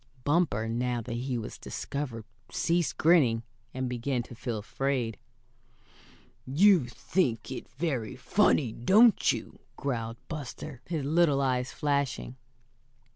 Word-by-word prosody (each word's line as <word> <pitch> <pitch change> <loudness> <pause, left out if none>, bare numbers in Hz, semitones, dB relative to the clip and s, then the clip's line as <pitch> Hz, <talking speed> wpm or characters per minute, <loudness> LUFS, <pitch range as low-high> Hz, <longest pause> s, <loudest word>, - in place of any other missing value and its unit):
Bumper, 145 -8 +1
now 120 +1 -1
that 115 +1 -6
he 125 +1 -2
was 110 - -6
discovered, 115 - -5 0.2
ceased 170 -3 0
grinning, 135 -9 +4 0.3
and 130 0 -3
began 125 +1 -1
to 120 - -12
feel 120 -1 -4
afraid. 120 +2 -2 1.3
"You 170 +1 +5
think 125 0 -1
it 130 - -6
very 130 -5 -2
funny, 155 - +2
don't 205 - +5
you?" - - -6 0.2
growled 115 -4 -3
Buster, 145 -3 -7
his 160 -5 -2
little 155 -2 +3
eyes 130 -1 0
flashing. 140 -3 -1
130 Hz, 120 wpm, -29 LUFS, 120-150 Hz, 1.3 s, You